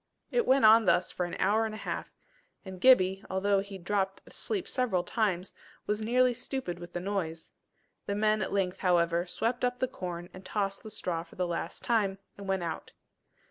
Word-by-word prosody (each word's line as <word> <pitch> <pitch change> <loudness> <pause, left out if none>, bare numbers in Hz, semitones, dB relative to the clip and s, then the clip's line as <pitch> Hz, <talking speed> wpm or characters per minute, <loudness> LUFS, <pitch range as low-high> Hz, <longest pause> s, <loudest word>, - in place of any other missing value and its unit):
It 480 -2 +1
went 265 -3 +5
on 220 +1 +8
thus 180 -1 +3
for 180 - -2
an 175 - -6
hour 210 +4 +3
and 215 - -6
a - - -6
half, - - -4 0.5
and 190 -1 -8
Gibbie 195 -7 +5
although 195 +1 +2
he 200 0 -6
dropped 195 +1 -1
asleep 400 -5 -3
several 230 -9 +1
times, 195 -3 -1 0.3
was 210 +1 -1
nearly 250 +3 +3
stupid 250 -7 -4
with 175 0 -10
the 175 - -2
noise. 175 -4 -3 0.6
The 200 - -1
men 215 +1 +2
at 190 - -2
length, 190 -2 0
however, 175 -1 +2
swept 230 +7 -1
up 250 0 +1
the 255 - 0
corn 175 -5 -6
and 185 - -11
tossed 195 0 -2
up - - -25
the - - -6
straw 180 -5 -2
for 170 - -15
the 180 - 0
last 170 -1 -4
time, 205 -5 +1 0.2
and 200 -1 -9
went 190 -2 0
out. 165 -1 -5
195 Hz, 200 wpm, -30 LUFS, 180-220 Hz, 0.6 s, on